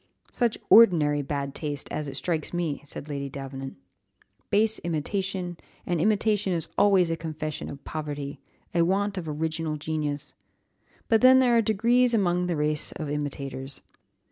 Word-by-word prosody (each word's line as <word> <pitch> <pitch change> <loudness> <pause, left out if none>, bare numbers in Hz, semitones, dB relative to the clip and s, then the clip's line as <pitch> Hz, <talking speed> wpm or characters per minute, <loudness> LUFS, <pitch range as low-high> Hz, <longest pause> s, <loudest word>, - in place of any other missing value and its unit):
"Such 240 -3 0
ordinary 155 -10 +6
bad 140 0 -3
taste! 145 -1 -4
as 150 - -3
it 135 - -6
strikes 160 +3 -2
me," 165 -5 -2
said 145 0 -9
Lady 140 -2 -4
Davenant; 135 0 -7 0.7
"base 220 +2 +3
imitation, 180 +2 -3 0.3
and 175 -3 0
imitation 210 -1 +2
is 165 -2 -2
always 195 -4 +4
a - - +1
confession 155 -2 -5
of 140 -1 -9
poverty, 145 -2 -5 0.3
a 170 - +3
want 195 +4 +1
of 165 -3 -6
original 155 0 -2
genius. 150 -1 -3 0.7
But 225 -1 +3
then 255 +1 +8
there 250 -2 +4
are 230 - +5
degrees 235 +3 +3
among 180 -3 +1
the 175 - 0
race 150 0 0
of 155 -3 -5
imitators. 140 -2 -5
160 Hz, 150 wpm, -26 LUFS, 145-200 Hz, 0.7 s, then